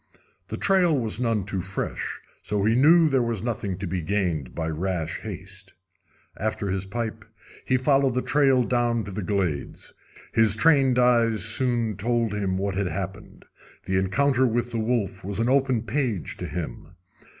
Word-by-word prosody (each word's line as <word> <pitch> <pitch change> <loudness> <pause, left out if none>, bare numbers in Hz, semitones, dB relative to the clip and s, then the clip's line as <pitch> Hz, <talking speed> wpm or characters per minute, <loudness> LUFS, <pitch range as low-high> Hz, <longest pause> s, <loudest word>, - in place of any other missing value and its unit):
The - - -5
trail 180 -6 +3
was 115 -3 -2
none 115 -4 0
too 95 -2 -3
fresh, 95 +1 -4 0.2
so 105 -1 -1
he 110 - +3
knew 160 +7 +6
there 135 -3 +2
was 115 -4 -2
nothing 100 -6 -3
to 100 - -5
be 90 0 -2
gained 85 -7 -2
by 80 -1 -2
rash 85 0 -2
haste. 95 -1 -8 0.6
After 105 -2 -2
his 95 0 -2
pipe, 110 0 -4 0.4
he 130 - +2
followed 135 -1 +2
the 125 - 0
trail 135 -3 +3
down 120 -1 0
to 105 - -7
the 100 +2 -4
glades. 90 -6 -3 0.4
His 110 -2 +4
trained 135 -3 +4
eyes 115 -4 +3
soon 115 -2 0
told 115 0 0
him 95 -3 -1
what 100 0 -1
had 95 0 -1
happened. 95 +2 -6 0.4
The 95 0 0
encounter 130 +7 +2
with 120 +1 -1
the 115 - -2
wolf 110 -4 -1
was 100 +1 -4
an 115 +2 +1
open 130 -4 +2
page 115 - -2
to - - -5
him. 85 +1 -6
110 Hz, 170 wpm, -25 LUFS, 95-125 Hz, 0.6 s, knew